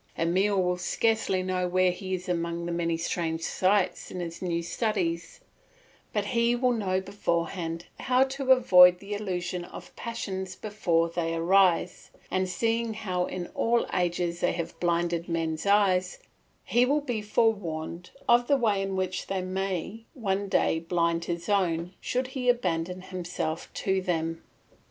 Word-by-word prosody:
Emile 190 +4 +2
will 180 -1 +1
scarcely 195 0 +1
know 185 -1 -1
where 185 0 +3
he 185 +1 -3
is 180 0 -8
among 170 -1 -2
the 175 - -3
many 170 -1 0
strange 165 -1 -2
sights 190 +1 +1
in 180 - -6
his 170 -1 -6
new 170 -2 -1
studies; 175 -3 -2 0.7
but 210 -1 -1
he 235 +2 +2
will 250 +1 +2
know 195 -5 0
beforehand 170 -3 -2
how 255 0 +3
to 265 0 -1
avoid 180 -8 +7
the 200 +3 -7
illusion 180 -3 -3
of - - -11
passions 190 -5 -5
before 175 -6 0
they 165 -1 -2
arise, 180 +1 +2 0.2
and 185 0 0
seeing 230 +2 0
how 185 -4 -1
in 180 -1 -4
all 235 +1 +1
ages 175 -1 0
they 175 - +1
have 170 -1 -5
blinded 170 0 0
men's 165 +1 -2
eyes, 190 -3 +3 0.5
he 240 - +3
will 285 +4 +2
be 245 -6 -3
forewarned 180 -6 -1 0.2
of 240 0 +5
the 280 - +4
way 215 -6 +1
in 195 0 -2
which 185 -1 -2
they 190 -1 -2
may 190 +3 -3
one 200 -5 -1
day 160 - +2
blind 170 0 0
his 170 0 -4
own 180 -3 +1
should 255 +1 -1
he 260 -2 -1
abandon 180 -6 0
himself 175 -3 -4
to 190 -1 0
them. 165 -2 -2
185 Hz, 155 wpm, -27 LUFS, 170-210 Hz, 0.7 s, avoid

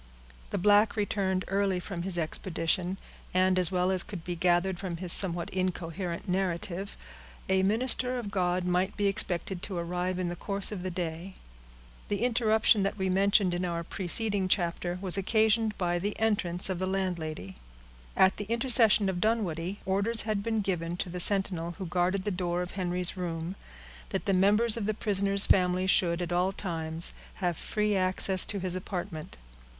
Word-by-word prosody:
The - - -3
black 205 +3 +3
returned 195 -3 -1
early 195 -1 0
from 180 -1 -6
his 180 0 0
expedition, 175 +2 -1 0.4
and, 185 0 +3
as 180 0 +3
well 180 0 +1
as 185 -1 +4
could 190 -3 -7
be 175 0 -4
gathered 175 +1 +1
from 180 -3 -5
his 175 0 +6
somewhat 175 -3 +6
incoherent 180 -1 -4
narrative, 185 +1 -3 0.5
a 190 0 +2
minister 250 +5 +2
of 220 -5 -5
God 180 -1 0
might 180 +2 -1
be 205 - 0
expected 185 -2 -1
to 190 -2 -4
arrive 180 +2 -3
in 185 -1 -2
the 175 - -4
course 200 +3 -2
of 200 -4 -5
the 185 - -4
day. 175 +1 -5 0.7
The 205 +2 -2
interruption 220 -3 +3
that 195 +2 -2
we 190 -1 -1
mentioned 195 -1 +3
in 175 +1 -2
our 170 -1 -3
preceding 195 +3 0
chapter 175 -1 -1
was 190 0 0
occasioned 220 +2 +1
by 175 -1 -1
the 205 +3 -4
entrance 195 -5 0
of 185 -2 -3
the 185 - -2
landlady. 170 - -4 0.6
At 190 0 +4
the 205 - -5
intercession 230 -2 +4
of 180 -2 -2
Dunwoodie, 200 -4 -1
orders 200 +4 +1
had 215 -2 -2
been 225 0 -1
given 175 -3 -3
to 180 - -4
the 180 - -5
sentinel 180 -3 +1
who 190 - -6
guarded 180 +2 -1
the 210 - -2
door 175 -1 -2
of 180 - -8
Henry's 180 -1 -1
room, 170 0 -5 0.5
that - - -4
the 200 - +1
members 210 +5 +4
of 210 -3 -3
the 215 - -1
prisoner's 200 -2 +3
family 180 0 +2
should, 180 -2 +2
at 175 - -6
all 180 +2 +1
times, 165 -4 -2 0.2
have 175 -3 -2
free 210 +4 -1
access 185 0 +2
to 205 - +1
his 185 -2 -2
apartment. 180 -3 -6
185 Hz, 175 wpm, -28 LUFS, 175-200 Hz, 0.7 s, his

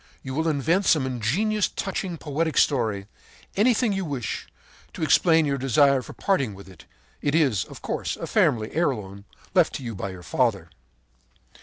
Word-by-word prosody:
You 130 - -5
will 160 +4 0
invent 160 +6 +1
some 150 -6 +3
ingenious, 165 - 0
touching, 185 -2 -4
poetic 160 +1 -2
story, 110 -8 +2 0.5
anything 230 +2 +3
that 195 - -1
you 195 - -1
wish, 135 -7 -4 0.5
to - - -5
explain 160 0 +4
your 140 -1 -1
desire 135 +1 +4
for - - -10
parting 135 - 0
with 100 -1 -12
it. 95 - -15 0.4
It 145 +1 0
is, 135 - +2
of - - -12
course, - - -3
a - - -5
family 110 -2 +1
heirloom 105 - -2 0.3
left 175 -5 +3
you 120 -4 -5
by 95 0 -4
your 90 -1 -9
father. 95 -2 0
140 Hz, 165 wpm, -25 LUFS, 110-165 Hz, 0.5 s, explain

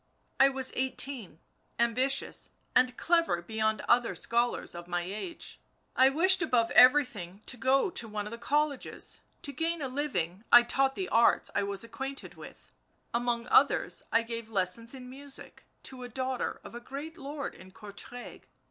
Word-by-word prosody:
I 270 - +7
was 265 -1 -1
eighteen, 260 - -1 0.4
ambitious 255 +4 0 0.3
and 250 0 +3
clever 335 - +2
beyond 220 +4 -1
other 240 0 +2
scholars 235 +1 -1
of 175 0 -8
my 175 0 -1
age. 210 - -6 0.4
I 260 +1 +6
wished 370 +6 +4
above 245 -8 +2
everything 240 -8 +4
to - - -4
go 265 - +2
to 235 - -3
one 210 -1 -4
of 210 - -7
the 235 - -7
colleges.... 295 +3 -1 0.2
To 280 - -5
gain 330 +3 -1
a 280 - -2
living 215 - -2
I 240 - +10
taught 270 +2 +1
the 375 - -3
arts 230 +1 +3
I - - +1
was 200 +1 -3
acquainted 270 +4 -6
with, - - -13 0.4
among 235 0 0
others - - +3
I 230 0 +3
gave 230 -1 -6
lessons 220 +4 -1
in 255 -1 -9
music 275 +2 -9 0.2
to 260 -1 -8
the 245 - -7
daughter 260 +1 -3
of - - -11
a 240 - -6
great 280 +6 -7
lord 285 -2 -5
in 185 +1 -14
Courtrai... 210 +5 -9
245 Hz, 165 wpm, -30 LUFS, 220-275 Hz, 0.4 s, I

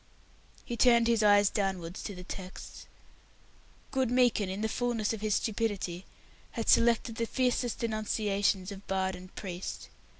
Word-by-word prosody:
He 240 - -4
turned 235 -1 +5
his 230 -1 +3
eyes 205 -1 +5
downwards 190 -4 -2
to 205 - -6
the 180 - -9
texts. 185 0 -9 1.0
Good 265 -3 +1
Meekin, 245 -5 +3
in 190 +2 -4
the 220 - +1
fullness 230 -2 -1
of 220 - -6
his 215 -1 +1
stupidity, 200 -5 -2 0.5
had 230 - -3
selected 230 -1 +3
the 230 - -1
fiercest 250 -1 0
denunciations 210 -3 0
of 200 0 -10
bard 190 -1 0
and 180 +1 -12
priest. 180 -2 -6
210 Hz, 145 wpm, -30 LUFS, 190-230 Hz, 1.0 s, turned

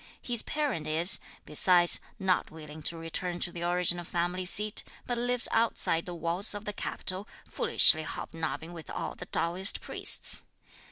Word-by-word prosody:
His 240 -2 +1
parent 285 - -3
is, 165 +4 +3 0.3
besides, 175 +3 +4 0.2
not 190 -3 0
willing 155 -1 -11
to 165 +2 -1
return 175 +2 -4
to 175 - 0
the 170 - -7
original 175 0 0
family 175 +2 -2
seat, 210 +3 +3 0.2
but 245 - -2
lives 245 0 +1
outside 225 -7 +1
the 175 - -6
walls 170 +6 +2
of 205 +1 -7
the 210 - -4
capital, 190 0 -4 0.2
foolishly 155 - +4
hobnobbing 160 +1 -5
with 165 -3 -10
all - - -4
the - - -10
Taoist 180 +4 +3
priests. - - 0
175 Hz, 155 wpm, -29 LUFS, 165-205 Hz, 0.3 s, besides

